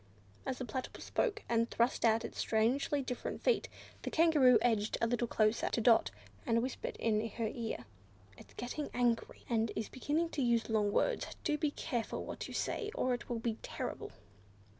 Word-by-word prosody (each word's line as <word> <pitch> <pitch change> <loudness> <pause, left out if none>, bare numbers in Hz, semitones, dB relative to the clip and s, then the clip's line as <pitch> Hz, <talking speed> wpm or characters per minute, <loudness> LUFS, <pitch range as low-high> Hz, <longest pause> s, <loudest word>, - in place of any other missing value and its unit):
As 260 - -1
the 255 - -4
Platypus 255 +3 -5
spoke, 435 -3 0
and 230 0 +2
thrust 235 +2 +1
out 225 0 +4
its - - -7
strangely 255 +6 +1
different 250 -1 -4
feet, - - +2 0.3
the - - -3
Kangaroo 310 -6 +6
edged 220 -3 +1
a - - +2
little 240 +1 0
closer 215 0 +2
to - - 0
Dot 230 0 +5 0.3
and 230 -3 +2
whispered 255 - -4
in 220 0 +1
her 230 +2 -3
ear. 225 - -4 0.5
"It's - - -16
getting 250 +5 -4
angry, 240 -1 0
and 225 -2 +1
is 220 - -3
beginning 305 +5 0
to 295 - -2
use 235 -2 +2
long 210 -2 +2
words; - - +1 0.2
do 300 - +1
be 300 0 +1
careful 245 -5 -3
what - - -5
you - - -8
say 425 - -1
or 255 - +1
it 245 - -5
will 240 - -1
be 225 -1 -2
terrible!" - - -5
240 Hz, 185 wpm, -34 LUFS, 225-270 Hz, 0.5 s, Kangaroo